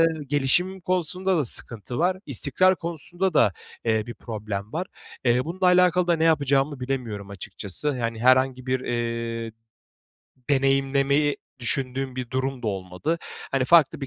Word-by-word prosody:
eee, 165 Hz, -, +6 dB, 0.2 s
gelişim 150 Hz, +7 st, +1 dB
konusunda 185 Hz, +1 st, 0 dB
da 155 Hz, -, +1 dB
sıkıntı 115 Hz, 0 st, 0 dB
var. 180 Hz, +2 st, +2 dB
İstikrar 185 Hz, 0 st, +2 dB
konusunda 170 Hz, +2 st, -3 dB
da, 110 Hz, -8 st, +5 dB, 0.3 s
eee, 110 Hz, -1 st, +1 dB
bir 120 Hz, -, -7 dB
problem 105 Hz, -2 st, -5 dB
var. 175 Hz, +4 st, -2 dB, 0.4 s
Eee, 125 Hz, +1 st, +3 dB
bununla 185 Hz, +3 st, -1 dB
alakalı 180 Hz, 0 st, +4 dB
da 170 Hz, -, +3 dB
ne 160 Hz, -, +1 dB
yapacağımı 140 Hz, -3 st, +2 dB
bilemiyorum 120 Hz, -6 st, -4 dB
açıkçası. 105 Hz, +7 st, -3 dB
Hani, 115 Hz, -1 st, -2 dB
herhangi 130 Hz, 0 st, +3 dB
bir, 130 Hz, 0 st, 0 dB
eee, 115 Hz, -2 st, -3 dB, 1.0 s
deneyimlemeyi 135 Hz, +1 st, +2 dB, 0.2 s
düşündüğüm 130 Hz, +1 st, -2 dB
bir 125 Hz, -2 st, -4 dB
durum 130 Hz, -1 st, -2 dB
da -, -, -3 dB
olmadı. 95 Hz, -, -2 dB, 0.3 s
Hani, 135 Hz, -1 st, +1 dB
farklı 160 Hz, +1 st, +5 dB
bir 135 Hz, -, -4 dB
135 Hz, 145 wpm, -25 LUFS, 120-165 Hz, 1.0 s, eee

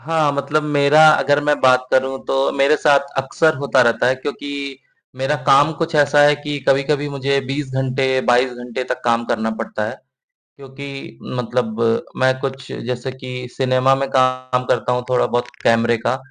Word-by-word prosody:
हाँ, 155 Hz, -2 st, 0 dB
मतलब 140 Hz, +2 st, -1 dB
मेरा 145 Hz, 0 st, +3 dB
अगर 145 Hz, -1 st, +2 dB
मैं 150 Hz, 0 st, +1 dB
बात 130 Hz, 0 st, +3 dB
करूँ, 130 Hz, 0 st, +1 dB
तो 135 Hz, 0 st, +1 dB
मेरे 140 Hz, +2 st, +3 dB
साथ 145 Hz, -2 st, +3 dB, 0.2 s
अक्सर 155 Hz, +4 st, +1 dB
होता 140 Hz, +1 st, +1 dB
रहता 120 Hz, 0 st, +1 dB
है 130 Hz, -, +3 dB
क्योंकि 140 Hz, 0 st, -6 dB, 0.4 s
मेरा 135 Hz, +3 st, -1 dB
काम 145 Hz, +3 st, +5 dB
कुछ 165 Hz, +2 st, -4 dB
ऐसा 145 Hz, 0 st, +4 dB
है 145 Hz, 0 st, +5 dB
कि 145 Hz, 0 st, -5 dB
कभी-कभी 140 Hz, +2 st, +1 dB
मुझे 140 Hz, 0 st, -1 dB
20 135 Hz, 0 st, -4 dB
घंटे, 130 Hz, 0 st, 0 dB
22 125 Hz, +1 st, +2 dB
घंटे 125 Hz, +1 st, -6 dB
तक -, -, -4 dB
काम 120 Hz, 0 st, +1 dB
करना 110 Hz, -1 st, -2 dB
पड़ता 210 Hz, -, -4 dB
है, -, -, -7 dB, 0.6 s
क्योंकि 135 Hz, -, -10 dB, 0.2 s
मतलब 120 Hz, -2 st, -2 dB, 0.4 s
मैं 130 Hz, 0 st, +3 dB
कुछ 135 Hz, 0 st, -6 dB
जैसे 125 Hz, +2 st, -5 dB
कि 125 Hz, -1 st, -8 dB
सिनेमा 130 Hz, 0 st, +2 dB
में 135 Hz, 0 st, -2 dB
काम 130 Hz, -1 st, +1 dB
करता 125 Hz, 0 st, 0 dB
हूँ, 125 Hz, 0 st, -2 dB
थोड़ा-बहुत 120 Hz, -1 st, 0 dB, 0.2 s
कैमरे 115 Hz, 0 st, +2 dB
का, 120 Hz, +2 st, -1 dB
135 Hz, 170 wpm, -19 LUFS, 125-145 Hz, 0.6 s, काम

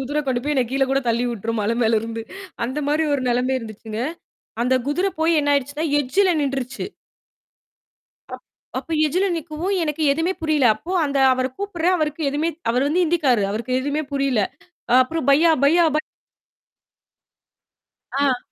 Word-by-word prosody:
குதிரை 290 Hz, +3 st, -1 dB
கொண்டு 250 Hz, -2 st, 0 dB
போய் 300 Hz, -, 0 dB
என்னைய 255 Hz, -3 st, +1 dB
கீழ 270 Hz, 0 st, 0 dB
கூடத் 270 Hz, -2 st, 0 dB
தள்ளி 235 Hz, +1 st, +1 dB
விட்டுரும் 230 Hz, 0 st, -3 dB
மலை 225 Hz, +3 st, 0 dB
மேலருந்து 225 Hz, 0 st, 0 dB, 0.4 s
அந்தமாரி 295 Hz, +5 st, 0 dB
ஒரு 265 Hz, -, -1 dB
நிலமை 250 Hz, +2 st, +1 dB
இருந்துச்சுங்க. 220 Hz, -1 st, -8 dB, 0.7 s
அந்தக் 255 Hz, 0 st, +1 dB
குதிரை 360 Hz, +7 st, +1 dB
போய் 325 Hz, 0 st, +3 dB
என்ன 290 Hz, -, +1 dB
ஆயிடுச்சுன்னா, 285 Hz, +3 st, -1 dB
எட்ஜில 370 Hz, +8 st, +2 dB
நின்றுச்சு. 270 Hz, -2 st, -3 dB, 1.5 s
அப் -, -, -9 dB, 0.3 s
அப்ப 330 Hz, -, -6 dB
எட்ஜில 365 Hz, +6 st, +1 dB
நிக்கவும் 330 Hz, +5 st, -3 dB
எனக்கு 305 Hz, 0 st, -2 dB
எதுமே 325 Hz, +5 st, 0 dB
புரியல. 310 Hz, -4 st, +2 dB
அப்போ 335 Hz, +11 st, -8 dB
அந்த 280 Hz, -1 st, -1 dB, 0.2 s
அவர 255 Hz, 0 st, -1 dB
கூப்பிடுறேன். 370 Hz, -3 st, 0 dB
அவருக்கு 310 Hz, 0 st, -2 dB
எதுவுமே 295 Hz, +4 st, 0 dB, 0.2 s
அவரு 255 Hz, +4 st, +1 dB
வந்து 355 Hz, +4 st, +2 dB
இந்திக்காரு. 285 Hz, -10 st, +2 dB
அவருக்கு 235 Hz, +4 st, -2 dB
எதுவுமே 285 Hz, +3 st, -2 dB
புரியல. 275 Hz, -5 st, +1 dB, 0.5 s
அ -, -, +4 dB
அப்பறம் 315 Hz, +1 st, -4 dB
பையா, 315 Hz, +4 st, +5 dB
பையா, 335 Hz, +5 st, +5 dB
ப -, -, +4 dB, 2.2 s
ஆ. 270 Hz, -3 st, +2 dB
280 Hz, 150 wpm, -22 LUFS, 250-320 Hz, 2.2 s, பையா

